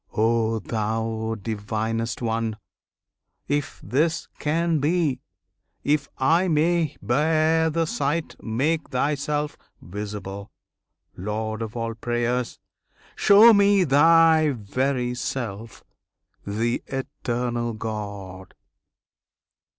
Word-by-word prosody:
O 115 0 +2
Thou 110 +1 -2
Divinest 110 +3 -3
One! 115 -1 -1 0.9
If 145 +2 -2
this 160 +5 0
can 165 +1 +1
be, 150 -3 +1 0.6
if 145 -1 +1
I 165 +7 +3
may 160 -1 +1
bear 155 +6 +2
the 165 +1 0
sight, 155 +1 -2
Make 145 +8 -1
Thyself 145 +2 -1 0.2
visible, 100 +2 -7 0.7
Lord 110 +3 -3
of 115 +1 -5
all 115 0 -2
prayers! 120 +1 -2 0.6
Show 215 +3 +7
me 200 -1 +5
Thy 160 +1 +5
very 125 +2 -1
self, 115 -4 -5 0.6
the 115 +4 -1
Eternal 120 -3 -3
God! 100 -4 -6
125 Hz, 90 wpm, -24 LUFS, 110-155 Hz, 0.9 s, Show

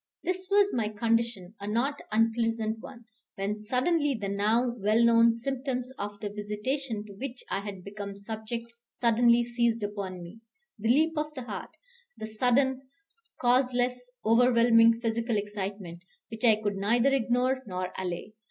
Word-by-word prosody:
This 370 0 -2
was 405 0 +4
my 225 -3 0
condition 230 -3 -1
a 200 - -6
not 255 +7 0
unpleasant 225 0 +1
one 240 -1 -11 0.3
when 200 +2 -2
suddenly 265 +5 +1
the 200 -2 -3
now 220 +5 +1
well 215 +3 +3
known 230 0 +5
symptoms 255 +1 -3
of 205 0 -5
the 205 - -3
visitation 210 +3 -3
to 205 - -11
which 250 +4 -7
I - - 0
had 200 -2 -7
become 200 0 -7
subject 220 +3 -6 0.2
suddenly 235 0 +3
seized 235 -2 0
upon 195 -3 -4
me, 175 +6 -11 0.4
the 220 +2 -1
leap 315 +6 +4
of 300 0 -2
the 260 - -5
heart; - - -6 0.5
the - - -5
sudden, 250 +4 +1 0.6
causeless, 250 0 +1 0.2
overwhelming 230 0 +5
physical 230 0 0
excitement, 200 -4 -5 0.3
which 225 +1 -8
I 225 -3 +6
could 205 -2 -3
neither 235 +7 +2
ignore 255 +1 +1
nor 185 -1 -4
allay. 180 +3 -4
230 Hz, 150 wpm, -28 LUFS, 210-250 Hz, 0.6 s, I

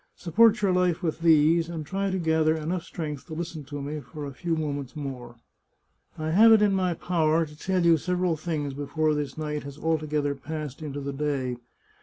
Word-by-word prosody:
Support 215 +6 +4
your 195 - +4
life 180 -1 +1
with 160 -1 -1
these, 165 0 +4
and 160 -3 -5
try 195 +4 -1
to 190 - -1
gather 160 -2 +2
enough 170 +3 -2
strength 150 -4 -6
to 160 - -7
listen 165 -2 -5
to 145 0 -6
me 150 +2 -4
for 145 +2 -8
a 140 - -6
few 170 +4 -2
moments 145 -4 -4
more. 130 -5 -6 0.8
I 155 0 -2
have 220 +6 +7
it 220 -1 +7
in 205 -1 +3
my 185 -2 +1
power 165 -2 +1
to 150 -1 -13
tell 180 +2 0
you 165 -1 +6
several 180 +1 0
things 150 -3 -3
before 155 +2 0
this 145 -2 -3
night 150 -1 -3
has 140 0 -9
altogether 155 -2 0
passed 150 0 -6
into 145 -2 -5
the 140 0 -4
day. 135 -4 -2
155 Hz, 200 wpm, -26 LUFS, 145-170 Hz, 0.8 s, have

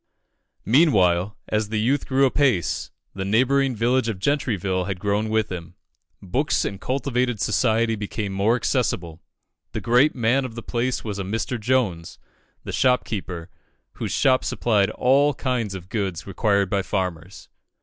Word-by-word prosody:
Meanwhile, 100 - +3
as 105 -1 -1
the 110 -1 -1
youth 130 +6 +1
grew 135 +1 +3
apace, 130 - +1 0.2
the 95 - -4
neighbouring 130 +6 +2
village 120 +2 +1
of 110 - -3
Gentryville 95 - 0
had 95 -1 -4
grown 105 +2 0
with 110 -2 0
him. 90 0 -7 0.5
Books 130 +11 0
and 100 -1 -5
cultivated 125 -1 -1
society 110 +3 +1
became 105 -1 -4
more 100 +4 +2
accessible. 95 - -1 0.5
The - - -2
great 125 +6 +3
man 125 +3 +2
of 120 -3 -6
the 115 - -7
place 125 +1 -2
was 105 -3 -4
a - - -2
Mr. 115 +5 -3
Jones, 105 -8 -1 0.5
the - - -6
storekeeper, 100 -9 -1 0.4
whose - - -4
shop 130 -1 +3
supplied 105 -4 +1
all 135 +5 +3
kinds 120 -7 -2
of 90 -2 -9
goods 95 -6 -3
required 100 0 +1
by 100 +2 0
farmers. 95 -2 -4
110 Hz, 150 wpm, -23 LUFS, 95-125 Hz, 0.5 s, Meanwhile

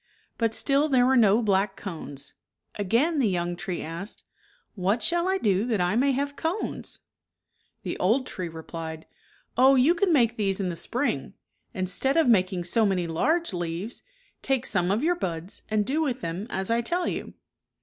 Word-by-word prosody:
But 225 -1 +1
still 285 +2 +2
there 255 -3 +4
were 265 +1 +4
no 225 -1 +5
black 195 -1 +1
cones. 145 -7 -6 0.4
Again 235 - +1
the 235 -6 +3
young 175 -1 -1
tree 185 -1 -4
asked, 170 +6 -7 0.3
" - - -37
What 205 +3 0
shall 345 +8 +1
I 380 - +2
do 200 - +1
that 225 -5 0
I 180 +3 +1
may 270 +4 +3
have 285 +2 -2
cones? 335 +8 -4 0.4
" - - -46
The - - -4
old 230 +8 +2
tree 185 -7 -5
replied, 160 0 -7 0.3
" - - -34
Oh, 265 +2 +7
you 265 +6 +5
can 360 +1 +1
make 235 -6 +3
these 195 -2 0
in 190 -2 -1
the 170 - -4
spring. 250 +10 -2 0.4
Instead 190 - 0
of 325 - +4
making 185 -5 +3
so 220 +6 +2
many 190 -4 +1
large 310 - 0
leaves, 175 +5 -4 0.4
take 265 -2 0
some 180 -7 0
of 210 +7 +1
your 345 +3 +3
buds 175 - -4
and 215 -1 +1
do 290 +7 0
with 260 -5 -1
them 170 +6 -4
as 190 0 -2
I 230 +1 +2
tell 350 +9 -1
you." - - -4
215 Hz, 190 wpm, -26 LUFS, 180-270 Hz, 0.4 s, Oh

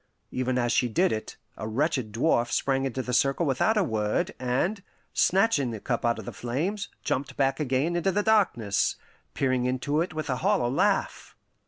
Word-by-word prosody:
Even 130 0 -1
as 120 -1 +1
she 125 - +2
did 175 +12 +2
it, 110 0 -4 0.2
a 110 - -5
wretched 130 -1 -1
dwarf 120 +1 +1
sprang 135 -1 +1
into 130 0 -2
the 125 - -4
circle 135 +7 +2
without 150 - +2
a 205 - +4
word, 105 - -1
and, 135 +12 0 0.3
snatching 190 - +3
the 110 -2 -5
cup 120 +3 -2
out 120 0 +1
of - - -8
the - - -6
flames, 175 - -3
jumped 135 +1 -2
back 135 -1 +1
again 145 +4 0
into 175 +3 +1
the 205 +2 0
darkness, 180 - +2 0.4
peering 130 -2 +1
into 135 +4 0
it 175 - -2
with 155 -1 -4
a 130 - -1
hollow 120 +1 +1
laugh. 135 - 0
130 Hz, 185 wpm, -27 LUFS, 120-165 Hz, 0.4 s, a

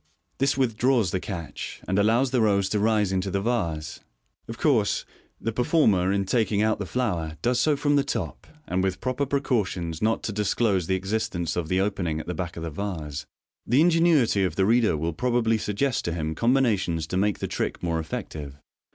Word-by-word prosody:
This 135 0 +2
withdraws 120 -4 +2
the 95 - 0
catch, 85 -4 -6
and 95 +2 +1
allows 115 +5 +3
the 125 -3 +2
rose 100 -3 +2
to 105 - 0
rise 105 -2 +2
into 95 0 -1
the 100 - 0
vase. 85 -9 -2 0.5
Of 115 - -7
course, 120 -10 +2 0.3
the 115 - -2
performer 110 - +2
in 100 0 0
taking 105 0 +1
out 110 -1 +1
the 100 - -4
flower 85 -11 -2
does 120 +1 +2
so 150 -2 +2
from 145 0 +2
the 140 - +3
top, 140 - -4 0.2
and 95 -6 -1
with 95 0 -1
proper 130 +4 -1
precautions 100 - -1
not 110 +1 +1
to - - -2
disclose 100 -3 +1
the 95 - +2
existence 95 -4 -2
of 85 -3 -2
the. 95 +3 +1
opening 95 -5 -1
at - - -7
the 90 - -3
back 85 0 -5
of 85 - -5
the 85 - -4
vase. 75 -5 -5 0.4
The 130 +5 +4
ingenuity 165 - +4
of 95 - -1
the 95 - +2
reader 110 -6 +3
will 80 +2 -2
probably 115 +2 +1
suggest 110 +6 -1
to 85 - -1
him 80 -2 -2
com 120 +10 +2
binations 95 -11 +1
to - - -3
make 100 +1 +1
the - - -3
trick - - -3
more 85 -1 0
effective. 75 -2 -6
100 Hz, 200 wpm, -25 LUFS, 90-120 Hz, 0.5 s, The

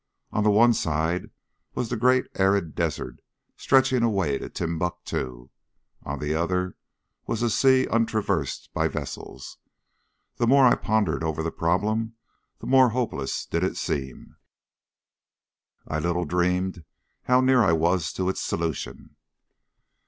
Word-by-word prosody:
On 105 - 0
the 105 - +4
one 115 +3 +5
side 80 -2 -1 0.5
was 120 - -2
the 120 - -1
great 125 +2 +3
arid 95 -4 +1
desert 75 -7 -3 0.4
stretching 130 -2 +3
away 95 -12 +1
to - - -7
Timbuctoo, 80 -7 -4 0.5
on - - -5
the 75 +1 -2
other 90 +2 -1 0.5
was 115 +1 -2
a 120 - +1
sea 130 +2 +4
untraversed 110 - -1
by - - +1
vessels. - - -7 0.8
The 120 - +1
more 135 +2 +6
I 120 - +6
pondered 100 -9 0
over 80 -1 -2
the 85 - -2
problem 110 +7 -1 0.4
the - - -11
more 130 -1 +5
hopeless 105 - -2
did 85 - -2
it 95 - -1
seem. 65 -3 -4 1.5
I 80 - -2
little 85 +2 -1
dreamed 90 0 0 0.4
how 125 0 +4
near 130 -1 +4
I 95 -6 +4
was 85 0 +1
to 95 - -2
its 95 - -1
solution. 80 -2 -4
90 Hz, 135 wpm, -25 LUFS, 80-115 Hz, 1.5 s, more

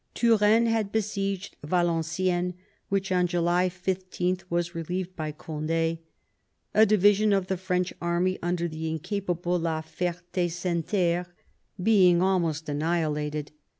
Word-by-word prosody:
Turenne 225 -1 +4
had 225 -3 0
besieged 200 -3 -2
Valenciennes, 175 +2 0 0.3
which 195 -1 -1
on 180 -1 +3
July 175 +1 +2
15 185 0 -2
was 170 0 -1
relieved 180 +2 -4
by 155 -2 -3
Cond^ 165 +1 -2 0.7
a 220 - +7
division 205 +1 +4
of 195 -2 +2
the 190 +1 -1
French 180 0 -1
army 175 +2 0
under 175 0 -1
the 160 0 -4
incapable 175 +1 -2
la 160 -1 -1
Fert^ 170 +2 -3 0.2
Senneterre 175 0 0 0.6
being 185 -5 +5
almost 170 -4 +1
annihilated. 150 -1 -1
175 Hz, 115 wpm, -27 LUFS, 165-190 Hz, 0.7 s, a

